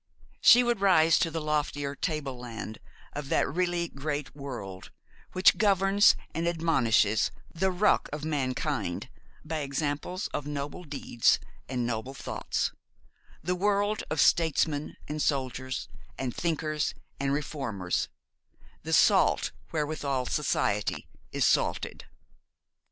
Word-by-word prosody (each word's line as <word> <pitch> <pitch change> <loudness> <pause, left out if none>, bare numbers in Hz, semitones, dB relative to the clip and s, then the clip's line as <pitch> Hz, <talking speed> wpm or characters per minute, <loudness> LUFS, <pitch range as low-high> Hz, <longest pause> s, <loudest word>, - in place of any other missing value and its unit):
She 245 - +8
would 240 -4 0
rise 165 -4 +5
to 165 - +2
the 165 0 -3
loftier 145 -2 -1
table 150 -4 -3
land 115 -3 -7 0.3
of 145 -1 -5
that - - +2
really 175 +2 0
great 145 -1 -4
world 120 -10 -7 0.4
which 185 - +5
governs 200 -1 +5 0.2
and 165 +2 -1
admonishes 130 -11 +2 0.2
the 190 +3 +1
ruck 195 +3 +2
of 150 +1 -4
mankind 130 - -2 0.4
by 160 +1 -2
examples 145 +5 -2
of 145 - -4
noble 145 +4 -5
deeds 140 -5 +2 0.3
and 125 -2 -1
noble 120 +3 -3
thoughts; - - -2 0.7
the 180 +3 0
world 205 +2 +1
of 155 0 -2
statesmen, 155 -2 +2
and 150 0 -3
soldiers, 130 -2 -1 0.3
and 130 -2 -3
thinkers, 155 -3 -1 0.2
and 135 0 0
reformers; 135 - -2 0.7
the - - -4
salt - - +4 0.2
wherewithal 145 -4 -1
society 105 -7 0 0.2
is - - +1
salted. - - +1
150 Hz, 120 wpm, -28 LUFS, 135-165 Hz, 0.7 s, She